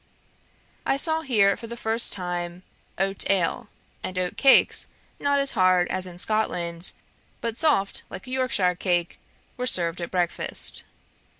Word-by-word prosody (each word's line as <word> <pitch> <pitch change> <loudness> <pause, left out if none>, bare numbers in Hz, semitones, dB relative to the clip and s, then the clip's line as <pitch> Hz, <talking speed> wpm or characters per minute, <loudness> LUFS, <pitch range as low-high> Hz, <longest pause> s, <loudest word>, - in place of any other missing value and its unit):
I 270 - +1
saw 320 +2 0
here, 210 -9 +3
for 230 - -9
the 235 +1 -7
first 225 0 +1
time, 175 -1 -4 0.3
oat 195 0 0
ale; 195 +3 0 0.3
and 185 - -5
oat 180 -1 -1
cakes 270 -1 +5 0.3
not 280 -1 +3
hard 185 -1 +3
as 185 0 -1
in 175 -1 -10
Scotland, 175 -4 0 0.5
but 230 0 -4
soft 280 -12 +1
like 190 - -8
a 255 - -7
Yorkshire 255 -9 +1
cake, 175 -1 -1 0.4
were 250 0 -1
served 175 -5 +1
at 170 - -4
breakfast. 180 -2 -2
195 Hz, 140 wpm, -25 LUFS, 180-235 Hz, 0.5 s, cakes